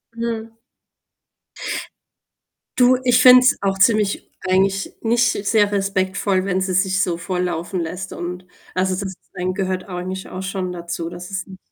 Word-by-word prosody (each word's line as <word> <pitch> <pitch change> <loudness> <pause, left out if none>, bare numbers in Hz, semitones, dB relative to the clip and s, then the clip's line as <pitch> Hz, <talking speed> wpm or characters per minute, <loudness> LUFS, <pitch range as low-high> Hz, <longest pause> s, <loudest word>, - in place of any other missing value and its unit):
Mhm. 230 -1 -4 2.2
Du, 255 0 +5
ich 245 -1 +4
finde 255 0 +10
es 255 - +4
auch 195 -1 0
ziemlich 210 0 +2 0.2
eigentlich 195 +1 +1
nicht 235 +1 +3 0.2
sehr 205 -1 +3
respektvoll, 195 -1 0
wenn 190 -1 0
sie 185 -1 -1
sich 190 +1 +2
so 175 -4 0
volllaufen 180 0 -2
lässt 180 +3 -5
und 180 +1 -6 0.3
also, 185 0 +1
das 190 0 -4 0.2
Trinken 180 +1 -2
gehört 185 -1 -2
eigentlich 185 +1 -5
auch 185 - -6
schon 185 -1 -3
dazu, 170 -1 -5
dass 175 +1 -9
es 195 -1 -4
nich 190 -1 -12
190 Hz, 150 wpm, -21 LUFS, 180-200 Hz, 2.2 s, finde